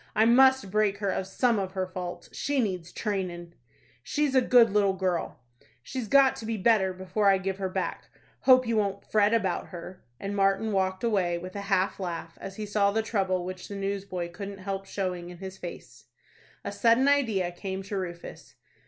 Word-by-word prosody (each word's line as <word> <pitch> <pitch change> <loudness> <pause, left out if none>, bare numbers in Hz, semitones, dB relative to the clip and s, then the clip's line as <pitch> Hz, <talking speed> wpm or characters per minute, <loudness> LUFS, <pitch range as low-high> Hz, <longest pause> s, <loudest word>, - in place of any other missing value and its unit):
I 220 - +5
must 260 -2 +5
break 210 -1 +2
her 200 -1 -1
of 190 - -2
some 235 +2 +1
of 190 -1 -3
her 190 -1 -1
faults. 180 -1 -7
She 285 -1 -1
needs 185 -7 -2
trainin'." 180 -5 -4 0.5
"She's 290 - 0
a 260 - +5
good 240 -3 +5
little 200 -1 +3
girl." 185 -7 -2 0.4
"She's 255 - -5
got 275 +2 +5
to 225 - -7
be 225 -1 -1
better 195 -2 +3
before 190 +3 -1
I 195 -1 +6
give 190 0 -3
her 190 -1 -1
back. - - -3 0.3
Hope 255 -1 +6
you 230 -1 0
won't 200 -2 -1
fret 210 -1 +3
about 220 -5 0
her;" 180 +1 -10 0.2
and 200 +1 -4
Martin 195 +2 +2
walked 190 0 0
away, 190 -7 +1
with 185 +2 -8
a 200 - -3
half 190 0 +1
laugh, 170 -3 -5
as 195 - -7
he 215 - -5
saw 205 -1 +2
the 220 +2 0
trouble 190 -5 0
which 185 0 -7
the 200 - -7
newsboy 195 -3 -3
couldn't 200 +3 -7
help 195 0 -5
showing 180 -3 -3
in 180 - -10
his 190 +1 -8
face. 175 - -9 0.6
A - - -3
sudden 235 +3 +3
idea 225 -11 +2
came 190 +2 -5
to 200 +1 -5
Rufus. 175 -3 -7
195 Hz, 195 wpm, -27 LUFS, 185-215 Hz, 0.6 s, I